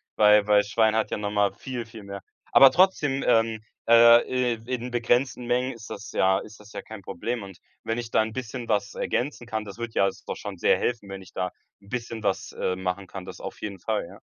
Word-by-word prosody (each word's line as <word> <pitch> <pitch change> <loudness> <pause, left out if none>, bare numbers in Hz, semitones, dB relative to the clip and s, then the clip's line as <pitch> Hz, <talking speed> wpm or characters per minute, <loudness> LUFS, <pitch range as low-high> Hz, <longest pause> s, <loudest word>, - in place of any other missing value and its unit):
Weil 105 -1 +5
weil 105 -1 +5
Schwein 110 +1 +2
hat 110 - 0
ja - - -1
noch 105 0 -3
mal 105 -1 +1
viel, 125 -3 -6
viel 115 -1 -11
mehr. 100 0 -7 0.3
Aber 135 -1 +8
trotzdem, 150 -7 +2
ähm 115 -2 +3 0.3
äh, 120 +1 +6
i - - -15
in 125 0 -3
begrenzten 120 +1 0
Mengen 125 +2 0
ist 115 -1 -11
das 100 - -7
ja 95 0 +3
ist 110 +1 -11
das 105 +1 -15
ja - - -5
kein 110 -3 -10
Problem. 115 +5 -4
Und 95 -2 -11 0.2
wenn 115 +2 -2
ich 115 -1 -5
da - - +4
'n 110 0 -3
bisschen 120 -1 -5
was 100 -2 0
ergänzen 125 -1 -2
kann 110 -2 -3
das 100 +1 -9
würd 120 -1 -5
ja 100 - +3 0.2
doch - - -3
schon - - -7
sehr - - +3
helfen, 115 -5 -2
wenn 95 0 -7
ich 95 -1 -15
da 90 -1 -2 0.3
'n 100 - -19
bisschen 115 -2 -5
was, 95 - -1
äh, 90 - -1
machen 95 +1 -3
kann. 95 0 -8
Das - - -9
auf - - -8
jeden 100 -2 -5
Fall, 105 -2 -2
ja. - - -14
110 Hz, 235 wpm, -26 LUFS, 100-120 Hz, 0.3 s, Aber